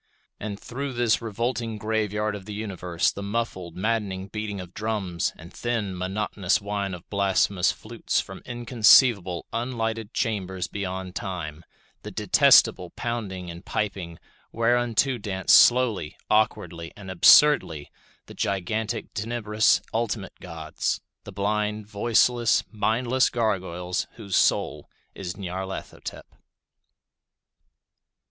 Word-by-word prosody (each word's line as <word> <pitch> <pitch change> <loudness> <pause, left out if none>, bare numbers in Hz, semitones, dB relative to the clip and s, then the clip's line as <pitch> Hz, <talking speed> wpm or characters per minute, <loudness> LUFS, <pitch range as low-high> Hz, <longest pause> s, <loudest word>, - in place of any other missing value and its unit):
And 105 -1 -5
through 135 +2 -5
this 120 -2 +2
revolting 115 0 -2
graveyard 105 0 -1
of 100 -2 -9
the 105 0 -6
universe 90 -5 -1
the 100 - -7
muffled, 100 -5 -3
maddening 100 -2 -1
beating 105 -1 -4
of 90 -1 -9
drums, 105 -6 -2
and 85 +3 -13
thin, 115 -6 -2
monotonous 95 0 0
whine 100 -2 -3
of 90 - -14
blasphemous 100 -2 +2
flutes - - -2
from - - -7
inconceivable, 120 -5 +4
unlighted 115 -2 -2
chambers 95 -7 -2
beyond 95 -2 -5
Time; 85 -5 -5 0.4
the - - -7
detestable 90 - +4
pounding 95 -7 -4
and 85 +2 -10
piping 95 -5 -3 0.3
whereunto 120 +2 +1
dance 95 -3 +1
slowly, 120 -10 +5
awkwardly, 95 -6 0
and 95 -2 -8
absurdly 85 - +5 0.3
the - - -12
gigantic, 110 +4 -2
tenebrous 110 0 +1
ultimate 115 -3 -2
gods—the 80 -3 -5
blind, 105 +1 -1
voiceless, 120 +3 +2
mindless 120 +4 +1
gargoyles 95 -6 -1
whose 100 -5 -4
soul - - +1 0.2
is 90 -2 -6
Nyarlathotep. 95 0 -6
105 Hz, 110 wpm, -25 LUFS, 95-115 Hz, 0.4 s, slowly